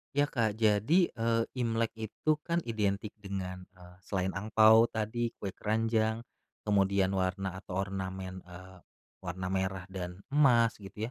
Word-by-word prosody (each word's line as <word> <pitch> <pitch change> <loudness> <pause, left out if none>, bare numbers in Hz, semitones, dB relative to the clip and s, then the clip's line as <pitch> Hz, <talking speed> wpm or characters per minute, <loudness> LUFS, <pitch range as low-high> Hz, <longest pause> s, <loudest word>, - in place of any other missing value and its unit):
Ya, 145 - +4
Kak, 110 -4 0
jadi, 110 - +3
eee, 115 0 +1 0.2
Imlek 115 -1 0
itu 150 +8 -1
kan 170 0 0
identik 105 -2 -1
dengan, 95 -2 -5
eee, 90 0 -15
selain 95 -1 -1
angpao 110 +2 +5
tadi, 115 +2 -2
kue 100 - -5
keranjang, 110 +2 0 0.4
kemudian 100 -2 +2
warna 95 0 -1
atau 95 -2 -8
ornamen, 95 -1 -5
eee, 90 +1 -12 0.4
warna 90 0 -5
merah 95 -1 -1
dan 90 0 -6
emas 120 -6 +4
gitu 105 +3 -6
105 Hz, 135 wpm, -31 LUFS, 95-115 Hz, 0.4 s, angpao